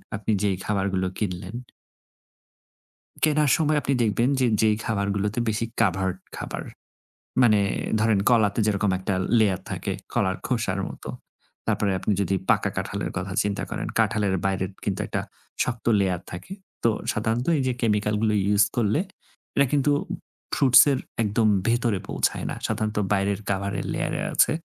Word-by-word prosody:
আপনি 105 +1 -2
যেই 95 -2 +1
খাবারগুলো 95 -2 0
কিনলেন 95 +1 -4 1.7
কেনার 150 -2 +3
সময় 155 -1 +2
আপনি 140 - +1
দেখবেন 115 +2 +2
যে 130 - +4
যেই 110 -1 +3
খাবারগুলোতে 100 0 -1
বেশি 110 +1 0
covered 95 -3 +1 0.2
খাবার। - - -5 0.8
মানে 110 -4 +5 0.4
ধরেন 110 -2 +3
কলাতে 110 -3 +3
যেরকম 105 -1 +1
একটা 95 +1 -2 0.3
লেয়ার 100 -4 +2
থাকে, - - -3 0.2
কলার 95 0 +1
খোসার 115 -6 -1
মতো। - - -9 0.6
তারপরে 100 -2 +1
আপনি 95 - -1
যদি 95 0 +1
পাকা - - +3
কাঁঠালের - - -3
কথা - - -4
চিন্তা 100 -1 -2
করেন, - - -4
কাঁঠালের 105 -3 +2
বাইরের 95 0 0
কিন্তু 100 -2 -2
একটা - - -2 0.4
শক্ত 120 -2 -4
লেয়ার 90 -3 0
থাকে 90 - -7 0.3
তো 115 - +5 0.2
সাধারণত 110 +4 -1
এই - - 0
যে 130 - +1
chemical 105 -1 +1
গুলো 110 -1 +2 0.2
use 100 0 +5
করলে 110 +4 +2 0.6
এটা 140 - +5
কিন্তু 145 0 +3 0.6
ফ্রুটস 130 -3 +7
এর 130 - +1 0.2
একদম 110 +1 +2 0.2
ভেতরে 115 -4 +1
পৌঁছায় - - 0
না - - -3
সাধারণত 110 0 -2 0.2
বাইরের 100 0 +1
কাভারের 100 0 -2
লেয়ারে - - -2
আছে। - - +4
105 Hz, 145 wpm, -25 LUFS, 100-115 Hz, 1.7 s, ফ্রুটস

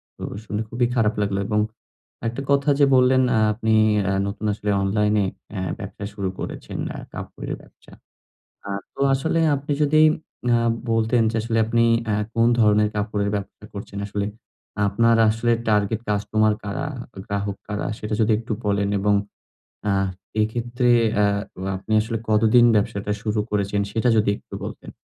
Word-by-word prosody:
তো - - -10 0.2
শুনে 105 0 -3
খুবই 120 +2 +1
খারাপ 110 -3 +2
লাগলো 100 -1 0
এবং 105 - +1 0.7
একটা 120 +4 -3
কথা 140 +1 +3
যে 145 - +7
বললেন 130 0 +5
আ - - +3 0.2
আপনি 110 0 0 0.4
আ - - +1 0.2
নতুন 100 +2 -5
আসলে 105 0 -4
অনলাইনে 105 +1 +2 0.3
অ্যা 95 -3 -4 0.2
ব্যবসা 100 - -7
শুরু 100 -2 -2
করেছেন, - - -6 0.2
আ - - -6
কাপড়ের - - -6
ব্যবসা। - - -20 0.8
আ - - -6 0.3
তো - - -10
আসলে 160 +5 0 0.2
আপনি 145 +2 -3
যদি 155 +1 +4 0.5
আ - - +4 0.3
বলতেন 115 +1 +2
যে 115 - -3
আসলে 115 0 0
আপনি 115 +1 +2 0.3
আ - - +2 0.2
কোন 115 0 +3
ধরনের 105 -1 +4
কাপড়ের 105 -1 -1
ব্যবসা 100 +1 -8
করছেন? 100 0 -7
আসলে 100 0 -2 0.6
আপনার 115 +3 +3
আসলে 115 +2 +1 0.2
টার্গেট 105 +1 +2
কাস্টমার 105 +1 +2
কারা? 105 +7 -3 0.4
গ্রাহক 100 -2 -3
কারা? 105 0 -2
সেটা 105 0 -3
যদি 110 0 +3
একটু 115 0 -5
বলেন 100 0 +1
এবং 100 +1 +2 0.8
আ - - +3 0.5
এক্ষেত্রে 120 +3 0 0.3
আ - - +5 0.5
আপনি 95 +3 -9
আসলে 115 +1 -3
কতদিন 110 +3 +5
ব্যবসাটা 105 -1 0
শুরু 105 0 0
করেছেন? 100 0 0
সেটা 115 +3 +1
যদি 105 - +3
একটু - - -17
বলতেন। - - -7
110 Hz, 155 wpm, -23 LUFS, 105-115 Hz, 0.8 s, যে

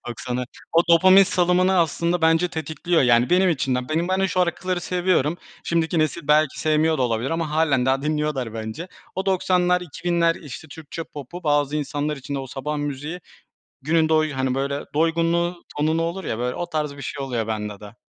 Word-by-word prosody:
90'a 125 +1 -3 0.3
O 165 +1 +5
dopamin 185 +3 +7
salımını 180 0 +2
aslında 170 +2 +1
bence 165 +2 +4
tetikliyor. 160 +1 -1
Yani 120 -1 +4
benim 185 +1 +4
içimden. 130 -4 -1
Benim 165 +3 0
ben 185 0 +1
şu 195 - +2
şarkıları 180 0 0
seviyorum. 175 -3 0 0.3
Şimdiki 165 0 0
nesil 155 0 -1
belki 150 -2 +3
sevmiyor 155 0 +2
da - - +1
olabilir 120 +1 -1
ama 165 -1 -2
hâlen 150 -5 +2
daha 135 +1 +1
dinliyorlar 150 -6 -1
bence. 110 +11 -6 0.3
O 190 +1 -3
90'lar 180 -1 +2
2000'ler 170 0 0
işte 150 +1 -10
Türkçe 160 +2 -8
popu 150 +5 -9
bazı 145 -1 +1
insanlar 150 +1 -2
için 140 +1 -6
de - - -1
o 135 - -5
sabah 145 +4 -4
müziği 145 +4 -4 0.6
günün 160 +2 +2
doy 155 -1 +2
hani, 130 -1 -1
böyle 140 +1 -2
doygunluğu 170 +2 +1
tonunu 155 +2 +1
olur 170 +3 -3
ya 110 - -3
böyle 125 +1 -2
o 175 - -4
tarz 150 -3 -2
bir 145 - -8
şey 140 +1 -5
oluyor 120 -4 -2
bende 105 -2 -4
de. 105 +1 -12
155 Hz, 180 wpm, -23 LUFS, 135-170 Hz, 0.6 s, dopamin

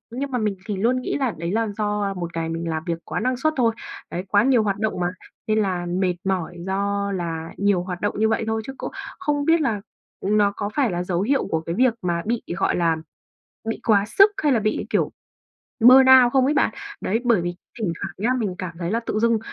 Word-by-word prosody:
nhưng 275 +2 -3
mà 250 - 0
mình 210 -4 -1
thì 210 -3 -3
luôn 245 +6 +1
nghĩ - - -2
là 265 -4 0
đấy 170 +2 -3
là 225 +2 +1
do, 210 -1 0
à, 200 -1 -1
một 170 -3 -6
ngày 165 -1 -2
mình 165 +1 -3
làm 160 -1 -2
việc 170 -2 -1
quá - - -3
năng 255 +2 0
suất 310 +4 +1
thôi, 230 -3 +3 0.4
đấy, 175 - -3
quá 205 +2 +4
nhiều 250 -3 +4
hoạt 200 -2 0
động 220 -3 -1
mà 175 - +1 0.4
nên 215 0 +2
là 185 -4 -1
mệt 180 +1 0
mỏi 185 -3 -2
do 200 +1 -1
là 165 -3 -3
nhiều 200 -3 +2
hoạt 180 -1 -6
động 205 - -1
như 220 0 +3
vậy 225 - 0
thôi 220 0 0
chứ 270 - -6
cũng - - -5 0.3
không 295 -5 0
biết 330 0 +4
là 220 -8 0 0.4
nó 205 0 +3
có 205 - -3
phải 270 -7 +2
là 175 0 -2
dấu 180 -1 -1
hiệu 265 +7 +1
của 160 - -1
cái 165 +1 -4
việc 250 +2 +3
mà 170 -1 -1
bị, 230 +1 -1
gọi - - +1
là, 165 -2 +2 0.7
bị 225 - -3
quá 205 -3 +4
sức 395 - +5
hay 295 - +4
là 240 - +3
bị 215 0 -1
kiểu - - +1 0.7
burn 255 +3 +8 0.2
out 240 - -1
không 265 -1 +4
ấy 290 - +2
bạn. 290 - +2 0.3
Đấy, 220 +4 0
bởi 230 -7 +4
vì 175 0 -3 0.2
thỉnh 195 -7 -1
thoảng - - -4
nhá, 220 +5 0
mình 200 -6 -2
cảm 170 -3 -6
thấy 170 0 -2
là 230 - +1
tự 215 - -2
dưng 230 0 +3
205 Hz, 245 wpm, -23 LUFS, 180-235 Hz, 0.7 s, burn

